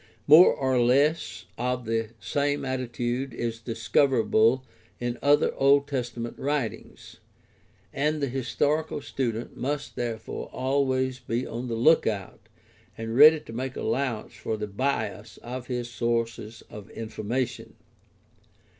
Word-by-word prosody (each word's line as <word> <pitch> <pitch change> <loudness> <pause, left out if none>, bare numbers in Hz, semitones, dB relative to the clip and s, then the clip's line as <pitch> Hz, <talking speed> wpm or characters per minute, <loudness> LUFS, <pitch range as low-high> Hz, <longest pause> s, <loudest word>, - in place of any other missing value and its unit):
More 160 +5 +9
or 130 -2 +1
less 140 - +2
of 125 0 -1
the 115 0 -1
same 145 +7 -1
attitude 125 0 -3
is 115 -1 -3
discoverable 115 +1 +2 0.3
in 120 0 -3
other 145 +1 +3
Old 140 +1 +4
Testament 120 -3 -4
writings, 140 -6 -4 0.8
and 150 +2 0
the 140 - +1
historical 145 +5 -1
student 120 -5 -3
must 145 +2 -3
therefore 115 -2 -4
always 130 -1 0
be 120 0 -2
on 120 +2 -5
the 115 - -2
lookout 115 - +1 0.5
and 115 0 -4
ready 155 +4 +8
to 115 - -11
make 130 +2 -4
allowance 130 -5 -2
for 110 - -4
the 105 - -3
bias 110 -1 -3
of 125 +1 -6
his 125 -2 -3
sources 115 -2 -2
of 105 -1 -11
information. 115 +3 -4
125 Hz, 120 wpm, -26 LUFS, 115-135 Hz, 0.8 s, More